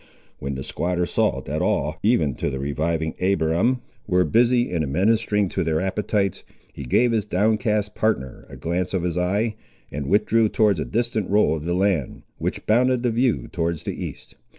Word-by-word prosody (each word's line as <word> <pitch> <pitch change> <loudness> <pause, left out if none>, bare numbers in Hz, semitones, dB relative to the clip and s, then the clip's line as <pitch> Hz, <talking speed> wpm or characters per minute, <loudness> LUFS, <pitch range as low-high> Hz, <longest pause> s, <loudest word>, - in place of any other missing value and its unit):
When 70 +1 -4
the 65 - -5
squatter 90 +3 -1
saw - - 0
that - - -3
all, 75 +2 0
even 85 - +2
to - - -1
the 65 - -4
reviving 80 +3 -1
Abiram, 95 +6 +1 0.3
were 90 -2 +3
busy 120 +3 +3
in 85 -3 0
administering 105 +7 +1
to - - -1
their 80 -1 0
appetites, 100 +1 -1 0.3
he 70 - -7
gave 120 - +3
his 110 -2 0
downcast 105 +1 +1
partner 65 - -2
a - - -10
glance 90 +3 -2
of 90 - -1
his 90 -2 -1
eye, 100 +6 0 0.4
and 70 0 -4
withdrew 110 +2 +3
towards 105 -6 +2
a - - -2
distant 115 -3 -1
roll 105 -5 +3
of 75 -1 -6
the 85 +1 0
land, 90 -8 0 0.2
which - - -3
bounded 125 +3 +3
the 120 - +2
view 120 +1 +1
towards 85 -3 -2
the - - -3
east. - - -8
95 Hz, 180 wpm, -23 LUFS, 80-110 Hz, 0.4 s, were